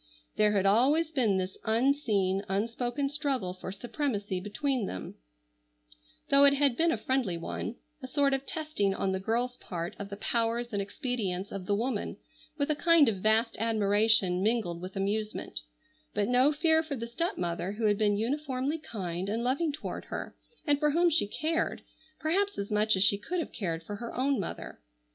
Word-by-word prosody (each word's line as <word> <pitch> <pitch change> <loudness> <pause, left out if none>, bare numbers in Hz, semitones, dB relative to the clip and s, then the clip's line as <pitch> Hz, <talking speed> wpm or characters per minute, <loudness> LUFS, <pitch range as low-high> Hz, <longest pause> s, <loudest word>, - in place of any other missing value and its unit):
There 210 0 +3
had 195 -1 +2
always 280 +11 +4
been 230 -10 +2
this 185 0 -3
unseen, 220 -6 +1
unspoken 240 +7 -1
struggle 275 - -1
for 185 0 -7
supremacy 205 -3 -2
between 235 +3 -1
them; 95 - -6 1.2
though 280 0 +7
it 280 0 +7
had 275 -3 +3
been 330 +5 +3
a - - 0
friendly 220 -5 0
one, 170 +6 -4 0.3
a 260 - -6
sort 280 +1 +2
of 270 0 -2
testing 300 -12 -1
on 195 - 0
the 190 - -1
girl's 240 +5 -1
part 170 -1 -5
of 200 -1 -6
the 200 - -6
powers 235 +2 0
and 200 - 0
expedients 200 -4 -3
of 190 -2 -6
the 205 - +2
woman, 230 0 -2 0.4
with 285 0 +1
a - - +1
kind 330 -3 +5
of 205 - -2
vast 220 +4 +2
admiration, 210 -3 +3
mingled 205 -6 0
with 185 +1 -7
amusement, 205 - -2 0.6
but 205 -1 +1
no 250 +4 +4
fear 320 +1 +3
for 315 -3 -4
the 230 -2 -4
stepmother 195 - -2
who 220 +1 -2
had 205 0 +3
been 205 -1 +3
uniformly 270 +5 -1
kind 190 - -4
and 225 +3 -1
loving 280 +6 +1
toward 285 - -6
her, - - -6 0.3
and 290 -3 +2
for 300 0 +3
whom 340 +3 +3
she 300 -9 +2
cared, 315 +9 -1 0.4
perhaps 395 +6 0
as 200 +1 -4
much 210 0 +3
as 190 - +3
she 200 0 +3
could 350 - -3
have 330 - -4
cared 165 -5 -3
for 205 +4 -6
her 235 +2 -6
own 270 +2 +1
mother. 85 - -6
230 Hz, 180 wpm, -29 LUFS, 200-280 Hz, 1.2 s, though